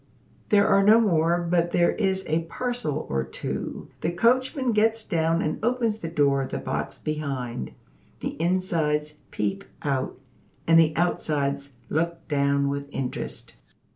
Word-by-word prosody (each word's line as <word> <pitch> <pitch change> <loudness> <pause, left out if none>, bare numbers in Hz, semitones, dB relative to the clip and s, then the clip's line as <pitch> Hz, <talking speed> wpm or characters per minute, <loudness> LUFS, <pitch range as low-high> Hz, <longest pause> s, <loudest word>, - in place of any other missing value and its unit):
There 205 -1 +5
are 195 - +5
no 215 +3 +7
more; 170 -5 +3
but 170 0 +1
there 170 0 +4
is 190 -3 0
a 160 +2 0
parcel 205 - -3
or 65 -1 0
two. 65 - -5
The 165 - 0
coachman 255 +6 +2
gets 225 +1 +2
down 165 -1 +1
and 155 - -3
opens 230 -2 +1
the 165 - -5
door 145 -4 +2
of 135 - -4
the - - -3
box - - -3
behind. 135 - -4 0.5
The - - -3
insides 165 -4 0 0.2
peep 195 +1 -2 0.2
out, 135 -2 -1 0.5
and 165 0 +6
the 155 -1 +4
outsides 140 -5 0 0.2
look 165 +1 -2
down 140 -1 +2
with 140 0 -3
interest. 135 -3 -5
165 Hz, 145 wpm, -25 LUFS, 140-195 Hz, 0.5 s, no